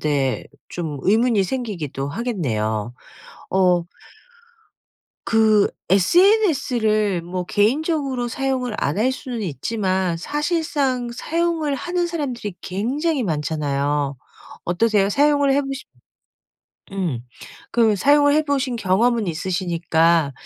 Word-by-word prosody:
데 140 -4 0 0.2
좀 155 -5 -5
의문이 220 +1 +3
생기기도 180 - -4
하겠네요. 120 - -2 0.6
어 180 -2 +3 1.4
그 220 -2 +4 0.2
sns를 220 - +3
뭐 180 +1 -4
개인적으로 265 - 0
사용을 255 -2 -2
안 145 - 0
할 250 +4 +3
수는 255 -3 -5
있지만 185 - -1
사실상 295 - -1
사용을 325 +1 -1
하는 350 +5 -1
사람들이 260 - -4
굉장히 265 - -1
많잖아요. 145 -3 -1 0.5
어떠세요? 200 +2 +2
사용을 285 +3 +3
해 285 +1 +2
보신 275 0 -5 1.1
음 170 -11 -2 0.5
그 225 -3 +3
사용을 290 +6 +4
해보신 285 -5 0
경험은 225 +2 +2
있으시니까 170 -3 +1
220 Hz, 235 characters per minute, -21 LUFS, 175-275 Hz, 1.4 s, 그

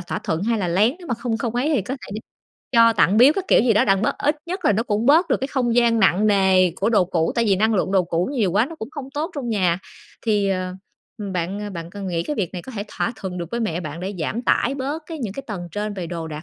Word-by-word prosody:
thỏa 175 - -4
thuận, 160 +3 -2
hai 230 +1 +1
là 180 -4 -1
lén, 210 +9 +3
nếu 350 - -11
mà 240 - -1
không 230 -1 -3
không 235 0 -3
ấy 280 +6 +1
thì 225 - +1
có 250 +8 -4
thể 265 - -11
đi 215 - -4 0.5
cho, 230 -1 +6
tặng, 185 +2 +3
biếu 255 +5 +7
các 390 - -2
kiểu - - +6
gì 235 -1 +3
đó 210 - +4
đặng 195 0 +2
bớt, - - 0
ít 295 +1 +1
nhất 365 +2 -5
là - - +5
nó 215 - +1
cũng 215 +1 -1
bớt 330 +5 +5
được - - +3
cái 270 - -2
không 245 -4 0
gian 235 -1 +3
nặng 190 +1 +4
nề 190 -3 +4
của 200 +4 0
đồ 205 -5 +4
cũ, 165 -2 0
tại 235 - +2
vì 200 -3 +3
năng 220 +2 +2
lượng 190 0 0
đồ 190 - +4
cũ 170 +3 -1
nhiều 215 -10 +1
quá 215 +6 +3
nó 330 - -9
cũng 225 -3 -7
không 285 -4 -8
tốt 310 +5 -2
trong 270 -5 -4
nhà. 185 -6 +1 0.4
Thì, 210 -3 +1
ờ, 185 -1 -2 0.6
bạn 195 +4 -3
bạn 170 -1 -7
cần 200 0 -7
nghĩ 170 -2 -1
cái 295 - -4
việc 185 -5 -2
này 180 -2 -6
có 260 - -10
thể 205 -2 -4
thỏa 235 - -2
thuận 185 -2 -5
được 170 -1 -5
với 235 - -2
mẹ 180 -6 -1
bạn 155 0 -6
để 190 +3 -4
giảm 220 +10 -2
tải 260 +2 +2
bớt 280 +4 -3
cái 325 -2 -6
những 225 -7 -4
cái 275 - -6
tầng 180 -6 -6
trên 210 0 -3
về 185 -4 -5
đồ 165 -1 -5
đạc 155 0 -7
210 Hz, 295 wpm, -22 LUFS, 185-245 Hz, 0.6 s, biếu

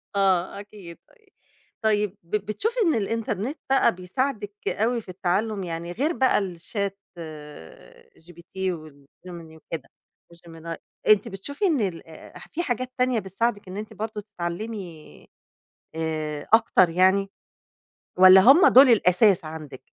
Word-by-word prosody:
آه 190 -1 +1
أكيد، 200 -4 -12
طيب 445 -4 -28 0.5
طيب 210 -2 0
ب 170 +5 -4
بتشوفي 430 - -2
إن 325 - +2
الإنترنت 225 - -2
بقى 270 -8 +3
بيساعدِك 205 +3 -3
أوي 235 +3 0
في 205 - -17
التعلم 195 +3 -1
يعني 170 0 -5
غير 280 - -1
بقى 260 -5 +2
الchat 195 +2 -4 1.3
gpt 170 +1 -18
والGemini 160 -1 -7
وكده 160 -4 -7 0.4
وGemini 165 -1 -9 0.3
أنتِ 215 +2 +5
بتشوفي 230 - -5
إن 315 -9 +2
ال 180 -6 -4
آآ 160 - -13
في 345 - -2
حاجات 255 -2 -3
تانية 250 -2 +1
بتساعدك 205 +2 -2
إن 185 +2 -7
أنتِ 215 0 -7
برضه 215 0 -5
تتعلمي 175 -2 -7 0.7
آآ 155 -2 -4
أكتر 205 -5 +4
يعني؟ 190 +3 +2 0.9
والّا 185 +1 +9
هم 275 - +7
دول 265 +2 +8
الأساس 195 -3 +4
عندِك؟ 155 -5 -9
195 Hz, 125 wpm, -24 LUFS, 170-225 Hz, 1.3 s, والّا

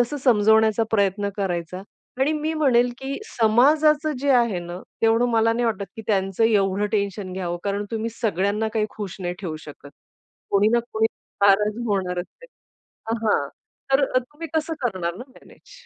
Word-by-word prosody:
तसं 245 +5 0
समजवण्याचा 220 -2 +4
प्रयत्न 200 -1 +1
करायचा 180 -2 -3 0.4
आणि 285 +3 +3
मी 310 +1 -2
म्हणेल, 250 -5 +3
की 270 +1 -4
समाजाच 300 - +3
जे 285 - +1
आहे 235 -7 +3
ना, 175 +1 -7 0.2
तेवढं 230 +2 +3
मला 225 0 +3
नाही 240 +1 -1
वाटत, 210 -3 -1
की 225 - -7
त्यांचं 195 0 +1
एवढं 205 -2 +2
टेन्शन 200 -2 -2
घ्यावं. 175 -2 -3
कारण 200 +1 -1
तुम्ही 225 0 -2
सगळ्यांना 205 +1 0
काही 215 -1 +1
खुश 205 -4 -7
नाही 175 -1 -3
ठेवू 165 -5 -4
शकत. 145 -1 -12 0.6
कोणी 200 +1 +4
ना 240 - +4
कोणी 220 0 +2 0.4
नाराज 210 +2 +4
होणारच 185 -4 -1 0.2
आहे. - - -11 0.8
हां 145 -9 +2 0.4
तर 275 +1 +5
ते 295 +6 -8
कसं 315 +1 0
करणार 185 -6 -1
ना 245 - -8
मॅनेज? 260 - -19
215 Hz, 160 wpm, -23 LUFS, 195-240 Hz, 0.8 s, तर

